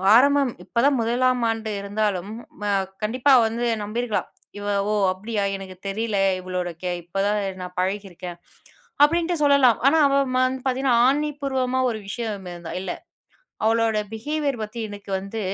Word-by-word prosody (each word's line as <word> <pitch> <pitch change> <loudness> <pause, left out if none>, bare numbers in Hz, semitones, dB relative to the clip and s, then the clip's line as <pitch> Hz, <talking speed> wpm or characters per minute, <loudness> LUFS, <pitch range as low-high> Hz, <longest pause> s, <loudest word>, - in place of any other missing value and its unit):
ஆரம்பம் 280 0 +5
இப்ப - - -10
தான் 280 -2 +4
முதலாம் 250 +2 +2
ஆண்டு 225 -1 -2
இருந்தாலும், 200 -1 -1 0.3
ம - - -5 0.4
கண்டிப்பா 250 +6 +2
வந்து 230 +2 -1 0.2
நம்பிருக்கலாம். 225 +1 -2 0.3
இவ 205 - -6 0.3
ஓ - - +1 0.2
அப்படியா, 205 +2 -3
எனக்கு 190 -1 -8
தெரில, 215 +1 -2 0.2
இவளோட 180 -1 -3
கே 180 -1 -2
இப்ப 195 +3 -3
தான் 210 0 +1 0.2
நான் 180 0 -7
பழகியிருக்கேன், 185 -2 -3 0.7
அப்படின்ட்டு 340 +3 +3
சொல்லலாம். 280 -5 +5
ஆனா 320 +3 +5
அவ 275 - +1 0.2
ம - - +3
வந்து 260 0 -4
பாத்தீங்கன்னா 260 -1 +2
ஆணி 295 +2 +2
பூர்வமா 260 -2 0
ஒரு 220 -2 -3
விஷயம் 220 -1 -3
ம 175 - -6
ந்த 165 - -7
இல்ல. 185 - -3 0.7
அவளோட 225 0 +2 0.2
பிஹேவியர் 280 +1 -2
பத்தி 215 +2 -6
எனக்கு 205 -1 -10
வந்து 200 +3 -6
225 Hz, 155 wpm, -23 LUFS, 200-260 Hz, 0.7 s, ஆரம்பம்